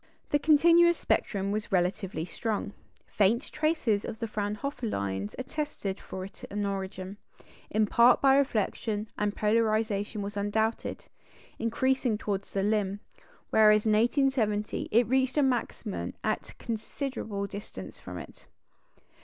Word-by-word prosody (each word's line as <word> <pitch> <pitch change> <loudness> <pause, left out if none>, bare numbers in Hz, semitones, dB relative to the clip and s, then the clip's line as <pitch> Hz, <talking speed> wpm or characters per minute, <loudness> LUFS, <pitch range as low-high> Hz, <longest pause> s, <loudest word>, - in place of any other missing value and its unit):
The 290 - +3
continuous 335 +3 +5
spectrum 200 -1 0
was 215 +1 -3
relatively 180 -2 0
strong; 210 +3 -3 0.3
faint 215 +6 +1
traces 305 -10 +1
of - - -5
the 230 - -3
Fraunhofer 215 +4 -3
lines 100 - -3
attested 255 -8 -4
for 185 0 -6
it 195 - -14
an 205 0 -2
origin, 195 0 -4 0.5
in 215 +1 +2
part 235 +4 +5
by 270 -1 +5
reflection; 220 -5 0
and 210 0 -1
polarisation 215 -1 +1
was 205 +1 -5
undoubted, 220 +2 -1 0.5
increasing 245 0 +1
towards 200 -2 -3
the 195 - -1
limb, 205 -1 0 0.5
whereas 215 -1 +6
in 220 - +3
1870 225 -3 +1
it 235 +3 +4
reached 260 +3 +1
a 295 - +5
maximum 240 -5 -2
at - - -1
a - - -13
considerable 225 -2 -4
distance 200 - -8
from - - -8
it. - - -11
215 Hz, 130 wpm, -29 LUFS, 200-250 Hz, 0.5 s, whereas